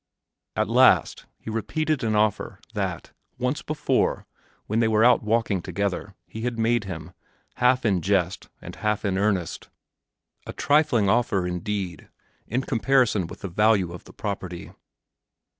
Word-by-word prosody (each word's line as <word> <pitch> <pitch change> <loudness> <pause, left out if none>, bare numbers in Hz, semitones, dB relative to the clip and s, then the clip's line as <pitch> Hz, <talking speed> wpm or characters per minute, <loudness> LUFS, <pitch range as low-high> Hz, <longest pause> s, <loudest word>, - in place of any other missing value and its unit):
At - - +1
last - - +4
he 110 - -7
repeated 155 +6 -1
an 110 -1 +1
offer 105 -1 0
that, - - -3 0.3
once 125 +4 -1
before, 155 0 0 0.4
when 110 +2 0
they 115 - +3
were 110 +1 +4
out 125 -1 +5
walking 110 -3 0
together, 100 +1 -3
he 110 - -8
had 120 0 -2
made 115 -1 +1
him, 80 -5 -7 0.5
half 125 0 +3
in 95 -5 +2
jest 95 -1 0
and - - -9
half 105 0 -1
in 95 -1 0
earnest 100 -4 -1 0.8
a - - -5
trifling 145 -8 +2
offer 110 -3 +2
indeed, 90 -1 -4 0.4
in 130 +4 -1
comparison 120 -7 +2
with - - -11
the 100 - -4
value 100 -1 +2
of 90 - -10
the - - -14
property. 95 -4 -5
105 Hz, 145 wpm, -25 LUFS, 95-120 Hz, 0.8 s, out